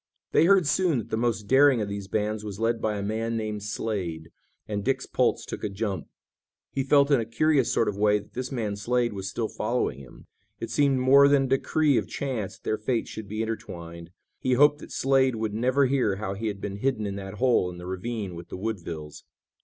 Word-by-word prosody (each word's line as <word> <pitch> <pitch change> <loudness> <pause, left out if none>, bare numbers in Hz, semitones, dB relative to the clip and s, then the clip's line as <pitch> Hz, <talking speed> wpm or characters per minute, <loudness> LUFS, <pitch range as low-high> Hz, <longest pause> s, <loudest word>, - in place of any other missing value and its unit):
They 160 - +5
heard 190 -1 +5
soon 170 -1 +2
that 115 - -5
the - - +1
most 115 -1 0
daring 135 +3 +5
of 105 - -1
these 100 -1 -5
bands 105 +1 -1
was 100 -1 -6
led 115 0 0
by 105 -1 0
a 100 - -3
man 115 +2 -2
named 105 -1 -3
Slade, 95 -6 -4 0.4
and 105 -1 -3
Dick's 135 +2 0
pulse - - +1
took - - -7
a 105 - -1
jump. 95 -4 -3 0.6
He 135 - -1
felt 140 +1 +4
in 140 - +5
a - - 0
curious 140 +3 +2
sort 115 - +2
of 100 - -2
way 105 0 +4
that 105 0 -11
this 130 +2 -4
man 110 -6 -2
Slade 120 +2 0
was 95 -1 -4
still 110 +2 -2
following 70 - -2
him. 65 -3 -14 0.3
It - - -5
seemed 140 -2 +3
more 135 +2 +6
than 140 -1 +4
a - - -1
decree 140 +1 +2
of - - -6
chance 125 -9 -4
that - - -35
their 110 - -1
fates 115 +2 -1
should 110 -2 -7
be 110 +2 -2
intertwined. 85 -6 -6 0.3
He 130 - +1
hoped 145 +3 +5
that - - -11
Slade 135 -2 +2
would 110 -1 -2
never 130 +5 +2
hear 125 -7 +1
how 100 -1 -4
he 110 +3 -4
had 100 -2 -3
been 100 0 -5
hidden 115 -2 -1
in 100 -1 -3
that 95 0 -7
hole 120 -6 +2
in 90 - -9
the 90 - -9
ravine 95 +1 -4
with 85 0 -9
the - - -6
Woodvilles. 85 -8 -5
110 Hz, 225 wpm, -26 LUFS, 100-130 Hz, 0.6 s, more